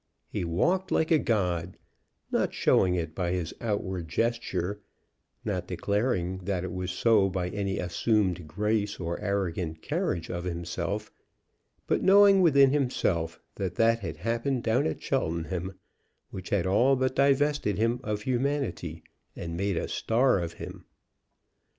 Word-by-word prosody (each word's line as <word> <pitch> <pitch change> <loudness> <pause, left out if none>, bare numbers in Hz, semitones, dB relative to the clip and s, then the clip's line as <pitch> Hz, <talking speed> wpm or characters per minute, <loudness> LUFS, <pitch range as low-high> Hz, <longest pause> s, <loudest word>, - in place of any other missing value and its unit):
He - - -3
walked 175 - +1
like 160 - +1
a 160 - +6
god, 90 - -1 0.5
not - - 0
showing 90 -1 +3
it 80 -3 -3
by 90 0 -1
his 90 -3 -2
outward 95 -6 -2
gesture, 105 -1 -1 0.6
not 90 -4 -2
declaring 95 0 -1
that 95 -1 -2
it 90 - -4
was 90 0 -3
so 100 +1 +3
by 90 -1 -2
any 100 0 -2
assumed 90 -1 0
grace 105 +4 -1
or 85 -1 -3
arrogant 90 -5 -2
carriage 85 -2 -1
of 85 0 -4
himself; 90 +4 -3 0.7
but - - +1
knowing 195 0 +7
within 140 -6 +6
himself 100 - 0 0.2
that 95 -2 -3
that 115 +2 +3
had 85 -7 -5
happened 115 - -1
down 110 -4 +2
at 80 - -3
Cheltenham 85 +3 -2 0.6
which 95 -1 -7
had 100 -4 +1
all 120 +9 +4
but 130 0 0
divested 140 -6 +2
him 115 +3 +1
of 105 -3 -3
humanity, 125 - -2 0.3
and 85 -1 -5
made 100 0 -1
a - - -1
star 120 -1 +2
of 85 -1 -4
him. - - -9
100 Hz, 145 wpm, -28 LUFS, 85-115 Hz, 0.7 s, knowing